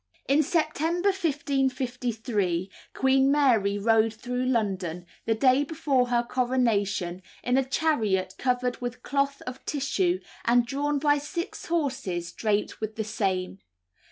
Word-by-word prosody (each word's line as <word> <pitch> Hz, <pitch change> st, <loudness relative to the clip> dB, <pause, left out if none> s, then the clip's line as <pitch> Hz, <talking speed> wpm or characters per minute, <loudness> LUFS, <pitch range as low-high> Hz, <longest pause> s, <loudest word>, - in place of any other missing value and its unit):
In 280 Hz, +3 st, +4 dB
September 330 Hz, +4 st, +1 dB
1553 250 Hz, -, -1 dB, 0.2 s
Queen 265 Hz, +1 st, +3 dB
Mary 230 Hz, -9 st, +3 dB
rode 225 Hz, +1 st, +3 dB
through 250 Hz, +2 st, -3 dB
London, 190 Hz, -8 st, -1 dB, 0.2 s
the 225 Hz, -, +3 dB
day 260 Hz, +4 st, +4 dB
before 285 Hz, -4 st, +1 dB
her 240 Hz, -1 st, +2 dB
coronation, 215 Hz, -8 st, 0 dB, 0.2 s
in 250 Hz, -, +1 dB
a 270 Hz, -, +4 dB
chariot 220 Hz, -, 0 dB
covered 250 Hz, -1 st, 0 dB
with 245 Hz, 0 st, -5 dB
cloth 280 Hz, +1 st, -1 dB
of 255 Hz, +1 st, -7 dB
tissue, 350 Hz, +6 st, 0 dB, 0.2 s
and 240 Hz, 0 st, +4 dB
drawn 285 Hz, +3 st, -1 dB
by 290 Hz, 0 st, +3 dB
six 340 Hz, +4 st, -5 dB
horses 260 Hz, -, -2 dB
draped 210 Hz, -1 st, -1 dB
with 215 Hz, 0 st, -3 dB
the 220 Hz, -, -2 dB
same. 190 Hz, -3 st, -2 dB
250 Hz, 130 wpm, -27 LUFS, 215-280 Hz, 0.2 s, In